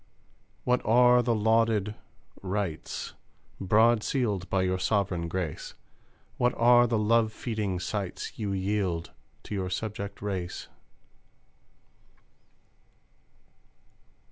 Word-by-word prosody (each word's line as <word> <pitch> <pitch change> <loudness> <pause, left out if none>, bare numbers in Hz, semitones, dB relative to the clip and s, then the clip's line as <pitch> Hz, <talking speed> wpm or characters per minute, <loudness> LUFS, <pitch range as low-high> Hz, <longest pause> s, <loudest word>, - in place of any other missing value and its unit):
What 125 0 +2
are 125 +2 +5
the 120 -1 +1
lauded 110 -1 +2 0.5
"rights," 95 -4 -3 0.5
Broad 110 +4 +4
sealed 105 -8 -1
by 95 -1 +1
your 95 0 0
Sovereign 95 -4 0
Grace? 85 -3 -4 0.6
What 125 0 +2
are 120 +1 +6
the 115 -1 +1
love 110 +1 +3
feeding 105 -5 -3
sights 95 +3 -4
You 105 -3 -2
yield 95 -3 -1 0.3
to - - -7
your 95 -2 -2
subject 100 +1 -4
race? 95 -3 -4
105 Hz, 95 wpm, -28 LUFS, 95-115 Hz, 0.6 s, are